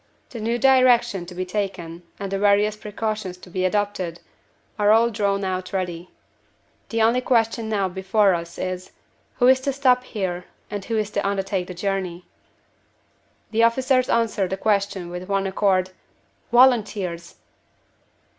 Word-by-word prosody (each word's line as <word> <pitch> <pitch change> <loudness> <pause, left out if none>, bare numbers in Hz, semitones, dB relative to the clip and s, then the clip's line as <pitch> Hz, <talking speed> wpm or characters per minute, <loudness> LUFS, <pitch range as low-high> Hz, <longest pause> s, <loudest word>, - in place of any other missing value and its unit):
The 235 - -7
new 230 +2 -1
direction 245 -8 +4
to 180 - -10
be 185 +1 -3
taken, 180 -4 -4 0.2
and 195 -1 -5
the 195 - -1
various 205 +1 +3
precautions 210 -3 -4
to 180 0 -15
be 185 +1 -1
adopted, 190 -3 -1 0.6
are 205 0 +3
all 230 +2 +5
drawn 200 -2 0
out 185 -1 -3
ready. 180 -2 -3 0.8
The 225 -1 +1
only 235 +3 +3
question 225 -2 +1
now 200 -3 +1
before 190 +2 +2
us 170 0 -5
is, 185 0 -5 0.4
Who 245 - +2
is 260 +1 +6
to 275 - 0
stop 255 -2 +3
here, 185 -7 -4 0.3
and 205 -1 -4
who 225 - -1
is 210 -1 -1
to - - -1
undertake 195 -2 -2
the 180 - -8
journey?" 185 -2 -3 1.3
The 225 +1 +2
officers 255 +2 +3
answered 220 -5 +1
the 190 - -2
question 200 -4 -1
with 180 +2 -7
one 195 -1 +1
accord 190 -1 +1 0.6
"Volunteers!" 210 -9 +2
200 Hz, 150 wpm, -23 LUFS, 185-225 Hz, 1.3 s, is